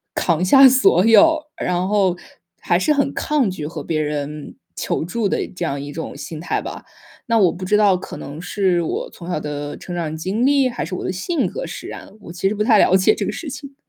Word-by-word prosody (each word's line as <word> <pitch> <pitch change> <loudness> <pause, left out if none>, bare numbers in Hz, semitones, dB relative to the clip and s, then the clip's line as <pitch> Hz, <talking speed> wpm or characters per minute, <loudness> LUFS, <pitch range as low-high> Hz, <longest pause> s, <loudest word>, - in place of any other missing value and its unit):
扛 170 -1 +1
下 270 +8 +8
所 235 -7 +4
有， 315 +7 +5 0.2
然 180 +1 0
后 190 -4 +2 0.4
还 175 - +2
是 300 +11 +2
很 280 -1 0
抗 290 -9 0
拒 155 -5 -6
和 165 - -7
别 155 -2 -1
人 150 0 -4 0.2
求 - - -2
助 210 +4 -1
的 - - -1
这 175 - -3
样 140 -3 -3
一 145 0 -7
种 160 - -6
心 160 - -7
态 - - -2
吧。 - - -8 0.4
那 230 -1 +2
我 185 -5 +4
不 185 - -7
知 210 - +2
道 200 -3 +4
可 180 - -9
能 150 +4 -8
是 180 -1 0
我 - - -3
从 170 - -10
小 175 - -1
的 145 -1 -5
成 180 - -8
长 160 -2 -3
经 190 +10 -1
历， 275 -2 +3
还 240 - -4
是 180 +2 -5
我 - - -5
的 - - -2
性 270 - -1
格 - - -5
使 - - -8
然， - - -9
我 170 - -10
其 175 +2 -1
实 210 - -1
不 210 - 0
太 220 -1 +5
了 190 - +5
解 190 +3 +4
这 - - -3
个 - - -2
事 320 - -6
情。 280 +1 -9
185 Hz, 255 characters per minute, -20 LUFS, 165-230 Hz, 0.4 s, 下